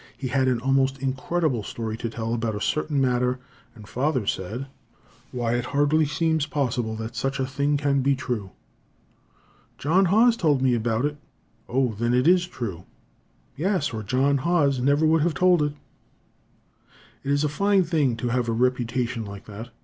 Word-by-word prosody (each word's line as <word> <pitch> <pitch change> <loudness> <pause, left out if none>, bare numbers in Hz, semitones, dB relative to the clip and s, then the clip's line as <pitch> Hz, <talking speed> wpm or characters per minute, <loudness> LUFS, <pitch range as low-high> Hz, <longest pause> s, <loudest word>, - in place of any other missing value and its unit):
He 130 - -4
had 130 +1 +1
an 125 -2 +1
almost 135 0 +2
incredible 135 0 -1
story 110 +1 -5
to 115 - -4
tell 115 0 -3
about 115 -2 -1
a - - -3
certain 150 +4 -1
matter, 125 -1 +1 0.4
and 105 -3 -13
father 130 -2 -1
said: 105 +7 -3 0.7
"Why, 120 -2 -1
it 120 0 -1
hardly 150 +1 +3
seems 160 +1 0
possible 125 -6 -1
that 110 +2 -6
such 135 +4 -2
a 130 - +1
thing 140 +2 0
can 140 -1 +1
be 140 +1 +2
true." 120 -7 -4 1.3
"John 180 +7 +3
Haws 225 +6 +4
told 150 - +2
me 130 -1 +2
about 115 +2 0
it." 145 0 -2 0.5
"O, 125 -2 +1
then 120 +3 0
it 125 +4 +2
is 180 0 +4
true!" 100 - -6 0.7
"Yes, 180 - 0
or 110 - -3
John 135 +7 +1
Haws 145 -4 +2
never 140 +4 +2
would 160 0 +3
have 165 0 +1
told 180 -3 +4
it." 150 -1 0 1.5
It 135 - -5
is 145 +1 +2
a - - +2
fine 200 +6 +2
thing 150 -8 +1
to 120 +2 -2
have 120 -1 0
a - - +1
reputation 125 0 0
like 100 -1 -9
that. 110 +3 -9
130 Hz, 175 wpm, -24 LUFS, 120-150 Hz, 1.5 s, Haws